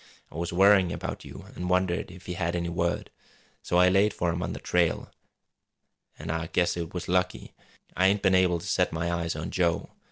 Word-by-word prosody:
I - - -14
was 85 +3 -3
worrying 95 0 +5
about - - -5
you - - -10
an' 90 - -4
wondered 90 -1 +1
if 90 +1 -13
he 90 - -4
had 85 -1 -2
any 85 -1 -2
word. 85 0 -2 0.5
So 90 - 0
I 90 +1 +6
laid 100 +2 +3
for 85 -1 0
him 85 +1 -3
on - - -3
the - - -6
trail 85 -2 0 1.1
an' - - -5
I 80 0 -2
guess 90 +1 +1
it 85 -1 -4
was 90 - -4
lucky. 90 0 -1 0.4
I 95 +2 +4
ain't 100 +1 +1
been 95 -2 +4
able 90 -2 +4
to 80 - -9
set - - +1
my 85 +2 -2
eyes 85 -2 -2
on 80 +3 -5
Joe. 85 -2 0
90 Hz, 215 wpm, -27 LUFS, 85-90 Hz, 1.1 s, I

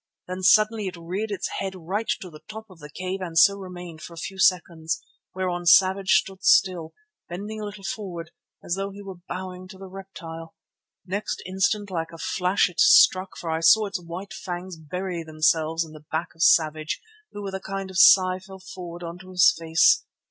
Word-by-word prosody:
Then 185 +1 -5
suddenly 215 +2 +4
it 180 - -6
reared 185 +6 -4
its 200 - -3
head 190 -1 -4
right 190 +6 -3
to 180 - -9
the 155 - -13
top 220 +1 -8
of 180 - -16
the 150 -1 -10
cave 185 +4 -4
and 170 -3 -5
so 200 +4 +7
remained 180 -4 -9
for 170 - -10
a - - -16
few 190 +3 -6
seconds, 170 -4 +1 0.4
whereon 180 -2 -2
Savage 190 +2 +5
stood 195 -1 +1
still, 185 - +3 0.3
bending 205 +5 -6
a - - -4
little 205 -1 -9
forward, 180 -5 -6 0.3
as - - -2
though 195 +1 -2
he 200 +1 -11
were 190 -3 -10
bowing 185 0 -6
to 190 - -12
the 195 - -10
reptile. 180 -4 -10 0.5
Next 200 +3 -4
instant, 200 +2 0
like 165 -2 -3
a 165 - -10
flash 180 +3 +1
it 180 - -10
struck, 185 +1 +5
for 165 - -4
I 160 - 0
saw 205 +7 +5
its 200 -2 -4
white 175 +4 -8
fangs 180 0 -6
bury 175 +3 -5
themselves 160 +1 +1
in 160 - -14
the 155 -1 -14
back 160 +2 -2
of 165 - -12
Savage, 155 -2 +3 0.3
who 205 - -7
with 195 -1 -5
a 190 - -3
kind 195 0 -5
of 185 - -1
sigh 185 -1 +7
fell 190 0 -12
forward 180 -2 -9
on 170 +1 -7
to 185 0 -13
his 180 -2 +5
face. 165 - +3
185 Hz, 200 wpm, -24 LUFS, 170-195 Hz, 0.5 s, so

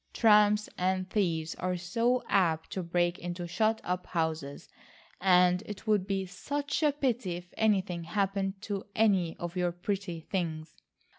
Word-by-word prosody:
Tramps 210 -1 +5
and 185 0 0
thieves 165 -6 0
are 180 0 -1
so 230 +8 0
apt 165 -5 +1
to 190 - -2
break 175 0 0
into 175 0 -5
shut 220 +6 +1
up 180 0 -3
houses, 160 -4 -3 0.5
and 180 -1 +4
it 205 -1 -8
would 210 -3 +2
be 195 -1 -1
such 285 - -3
a 300 -2 +4
pity 245 -10 -1
if 175 0 -10
anything 190 -6 +1
happened 195 +1 -1
to 200 -3 -4
any 195 -6 +2
of 175 +1 -5
your 180 -1 +1
pretty 175 0 -3
things. 160 -3 -4
185 Hz, 150 wpm, -30 LUFS, 175-210 Hz, 0.5 s, Tramps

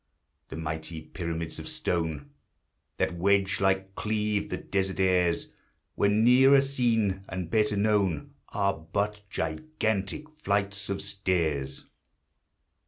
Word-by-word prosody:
The - - -6
mighty 80 0 -4
pyramids 85 0 -5
of - - -7
stone 80 -5 -2 0.7
That - - +1
wedge 100 +2 +2
like 95 0 +1
cleave 105 -1 -1
the - - -2
desert 95 -1 -2
airs, 90 -2 +2 0.4
When 105 +2 +3
nearer 130 +3 +7
seen, 115 -8 +1
and 90 -3 -4
better 105 -2 +2
known, 100 -6 +1 0.2
Are 100 -1 +1
but 100 +6 -2
gigantic 110 - -2
flights 100 -4 -1
of 100 - -2
stairs. 85 -8 -1
95 Hz, 110 wpm, -28 LUFS, 85-105 Hz, 0.7 s, nearer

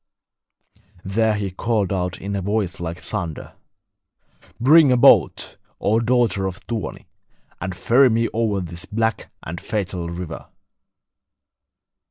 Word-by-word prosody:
There 110 +3 +1
he 100 -2 -3
called 105 0 -1
out 90 -1 -2
in 100 +1 -4
a 100 - -2
voice 100 -1 -1
like 85 0 -4
thunder: 80 -3 -6 1.1
'Bring 145 +3 +6
a 125 - +4
boat, 120 - +4 0.2
O 110 +3 +2
daughter 115 -5 +1
of 95 0 -6
Tuoni, 115 -1 -5 0.6
and 90 0 -4
ferry 130 +6 +4
me 115 0 +1
over 110 -4 0
this 85 -1 -6
black 110 0 -2
and 85 +2 -6
fatal 90 -5 -3
river.' 85 -1 -7
100 Hz, 125 wpm, -22 LUFS, 90-115 Hz, 1.1 s, Bring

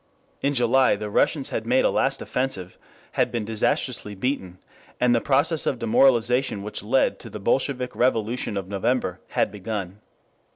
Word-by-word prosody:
In 140 +1 0
July 125 +1 +4
the 105 -1 -6
Russians - - +1
had - - -4
made - - +3
a - - +3
last - - 0
offensive, 125 -9 -3 0.3
had - - +1
been 115 -3 -2
disastrously 105 -1 -1
beaten, 95 -5 -3 0.4
and 125 -1 +3
the 115 - +2
process 145 +3 +2
of 130 - 0
demoralization 120 -1 +2
which 105 0 -5
led 125 +6 +1
to 115 - -9
the 105 - -7
Bolshevik 125 +4 0
revolution 115 -3 0
of 95 -2 -4
November 100 0 -1
had - - 0
begun. 100 -2 -5
115 Hz, 160 wpm, -24 LUFS, 105-130 Hz, 0.4 s, July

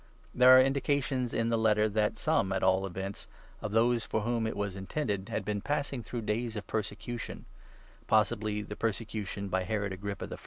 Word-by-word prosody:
There 130 +1 +8
are - - +9
indications 135 -1 +1
in 115 0 0
the 115 -1 +1
Letter 110 -1 +3
that 105 0 0
some, 95 - +1
at 95 - 0
all 95 +1 +3
events, 95 +2 -6 0.3
of 105 - -4
those 115 +1 +3
for 110 - -1
whom 115 0 0
it 110 - -4
was 100 -2 -2
intended 100 -1 -3
had 100 - -2
been 105 -1 -2
passing 140 -1 -2
through 115 +1 -5
days 115 +2 -1
of 105 - -5
persecution 110 +2 -4 0.3
— - - -27
possibly 110 -1 +2
the 105 0 -7
persecution 105 -2 -3
by 95 -1 0
Herod 100 0 -2
Agrippa 100 +1 -5
I. - - -5
110 Hz, 190 wpm, -30 LUFS, 100-120 Hz, 0.3 s, are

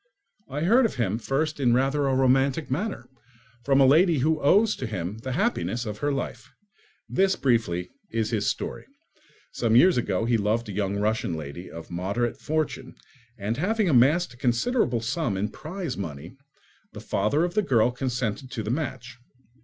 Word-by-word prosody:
I 145 +3 -4
heard 230 +9 +4
of - - -9
him 110 -3 -1
first 150 +5 -1
in 120 -3 +3
rather 135 +2 +1
a 135 - +1
romantic 135 +3 +2
manner, 170 - -3 0.6
from 135 +1 +3
a 135 - +7
lady 160 +5 +5
who 155 +3 +1
owes 205 +9 +4
to 130 - -4
him 100 0 -4
the 130 +3 -4
happiness 125 - -1
of 105 -1 -5
her 145 - 0
life. 125 -3 -4 0.6
This, 190 0 +2
briefly, 100 -9 0 0.2
is 115 0 -1
his 105 -3 0
story. - - -3 0.6
Some 115 -2 +1
years 175 +7 +6
ago 105 -3 0
he 115 0 +2
loved 110 +2 0
a - - -5
young 100 0 -1
Russian 110 -2 0
lady 80 +3 -7
of 85 +1 -10
moderate 100 +7 -2
fortune, 155 0 -3 0.4
and 110 +3 -3
having 210 +6 +1
amassed 145 +5 +4
a - - -17
considerable 120 - +1
sum 120 - -1
in 105 +3 -1
prize 165 - -6
money, 80 - -7 0.6
the - - -8
father 145 +9 0
of 175 0 -1
the 210 - +2
girl 125 - +2
consented 125 -1 -3
to 115 -4 -4
the 105 - -2
match. 125 -4 -4
125 Hz, 175 wpm, -25 LUFS, 110-150 Hz, 0.6 s, a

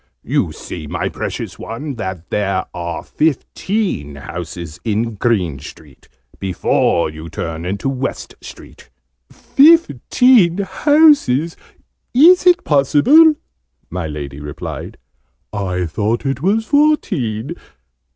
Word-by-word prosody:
"You - - 0
see, 80 -4 -8
my - - -3
precious - - -6
one, 140 +6 -6
that 95 -5 -6
there 100 -2 -1
are 85 -1 -5
fifteen 160 - -2
houses 85 0 -8
in 115 +1 -1
Green 95 - -1
Street, 70 -1 -14 0.3
before 90 -3 0
you 80 +1 -9
turn 80 +1 -5
into 100 +7 -3
West 135 0 -4
Street." - - -13 0.4
"Fifteen 250 - +4
houses! 205 - +3 0.6
Is 355 +7 +6
it 355 0 +5
possible?" 205 - +5 0.6
my 90 -2 -3
Lady 70 -2 -7
replied. 75 0 -7 0.6
"I 90 -3 -2
thought 110 - -2
it 135 0 -2
was 210 +6 +1
fourteen!" 165 - 0
115 Hz, 105 wpm, -17 LUFS, -, 0.6 s, Is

